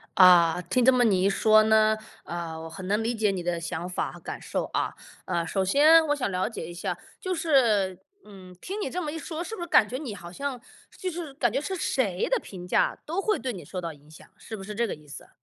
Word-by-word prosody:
啊， 180 -3 +7
听 190 +8 0
这 260 - +7
么 250 -1 +3
你 190 -4 +3
一 195 - +4
说 215 +2 +5
呢， 220 0 +4 0.3
呃， 170 -2 -5
我 165 - -7
很 185 +3 -8
能 210 +2 +1
理 235 +1 -1
解 210 -2 +2
你 185 - -3
的 175 0 -1
想 175 +1 -4
法 180 - -2
和 - - -12
感 - - -7
受 - - -2
啊。 - - 0 0.3
呃， 170 -2 -1
首 195 - 0
先 310 - +6
我 290 - +2
想 260 - -2
了 185 +3 -1
解 220 -8 -6
一 175 - -8
下， 175 0 -3 0.2
就 370 - -2
是 235 - +2 0.3
嗯， 185 -3 -13
听 395 +3 -5
你 - - -2
这 360 +6 -3
么 305 - -3
一 325 - -5
说， 320 +1 -5
是 445 - -6
不 365 - -8
是 345 - -4
感 210 - +6
觉 250 - -4
你 265 -6 -5
好 170 -4 -9
像 275 +3 -4 0.4
就 375 -3 -3
是 325 -4 -6
感 240 -5 +1
觉 270 +5 -1
是 380 +5 -3
谁 205 - 0
的 - - +3
评 180 - -10
价， - - +2
都 340 +6 -2
会 425 0 +1
对 255 -2 -3
你 180 -5 -8
受 185 +6 -6
到 170 -2 -5
影 150 +1 -19
响， 155 - -14
是 225 - -8
不 - - -9
是 210 +2 -7
这 235 +2 +1
个 220 - -3
意 150 0 -19
思 145 - -10
啊？ - - -21
215 Hz, 285 characters per minute, -26 LUFS, 180-280 Hz, 0.4 s, 啊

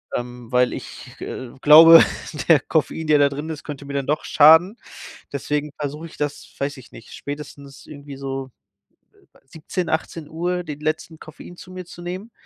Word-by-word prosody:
ähm, 120 -1 -7
weil 125 0 +3
ich, 125 +2 -10
äh, 130 -2 -6
glaube, 165 +2 +9 0.5
der 155 -4 +7
Koffein, 160 +2 -2
der 150 -1 +5
da 140 0 +4
drin 145 +3 -6
ist, 155 -2 -6
könnte 145 -2 -8
mir 140 - -7
dann 140 -1 -2
doch 150 +1 0
schaden. 160 +8 +6 0.6
Deswegen 150 +1 -2
versuche 150 +3 -5
ich - - -14
das, 145 -1 -5
weiß 140 +1 -3
ich 125 - -15
nicht, 115 - -14
spätestens 140 -1 -9
irgendwie 145 -2 -10
so, 135 -1 -5 0.6
äh, - - -26 0.3
17:00, 165 +5 -5
18:00 165 +3 -3
den 150 -3 -7
letzten 155 +1 -3
Koffein 175 +3 -12
zu 185 - -13
mir 185 -1 -8
zu 175 0 -12
nehmen. 185 +6 -7
150 Hz, 175 wpm, -21 LUFS, 140-160 Hz, 0.6 s, glaube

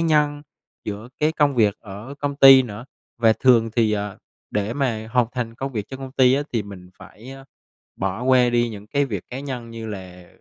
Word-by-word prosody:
nhân, 150 -3 +1 0.4
giữa 105 +3 -6
cái 155 +1 +2
công 145 -3 +2
việc 105 -4 +3
ở 110 +6 -9
công 140 0 -3
ty 135 -2 +9
nữa. 110 -1 -8 0.3
Và 115 -1 +5
thường 115 -2 +3
thì, 110 -2 +3
ờ, 105 -1 -3 0.3
để 105 +1 -1
mà 115 -6 -2
hoàn 125 -2 +3
thành 120 -2 -4
công 135 +3 -5
việc 105 -3 -4
trong 135 - -8
công 135 -1 -8
ty 130 -1 +4
á, 145 - 0
thì 115 -3 0
mình 95 -3 -12
phải, 120 +5 -13
ơ, 135 0 -11 0.5
bỏ 95 +4 -3
qua 125 -1 +4
đi 120 0 +1
những 105 -1 -10
cái 140 +6 +1
việc 100 -9 -5
cá 125 - -6
nhân 130 -4 -6
như 115 -1 -7
là 90 -4 -9
120 Hz, 215 wpm, -22 LUFS, 105-135 Hz, 0.5 s, ty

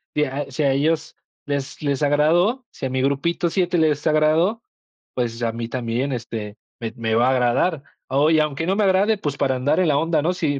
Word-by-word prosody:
si 150 - +2
a 140 +1 -5
si 140 +4 -2
a 140 - +3
ellos 155 +3 0 0.3
les 140 -1 -4
les 145 -1 -1
agradó, 170 - +2
si - - -7
a - - -1
mi 130 0 -1
grupito 140 +6 0
7 180 0 0
les 150 -3 +1
agradó, 155 +8 +2 0.5
pues, 120 -2 -2
a 115 - +1
mí 115 0 -5
también, 125 +2 -2
este, 110 -3 -6 0.2
me 115 -2 -5
me 110 -1 -1
va 120 +2 +3
a - - +3
agradar, 130 +5 +1 0.2
oye, 150 +4 +3
aunque 150 +1 -2
no 190 - +1
me 210 - +1
agrade, 200 +3 +3
pues, 145 -7 -4
para 130 -2 +1
andar 140 +6 +1
en 185 - +3
la 140 - +3
onda, 160 0 +1
¿no?, 170 +4 0
si 150 -6 -1
145 Hz, 215 wpm, -22 LUFS, 130-165 Hz, 0.5 s, a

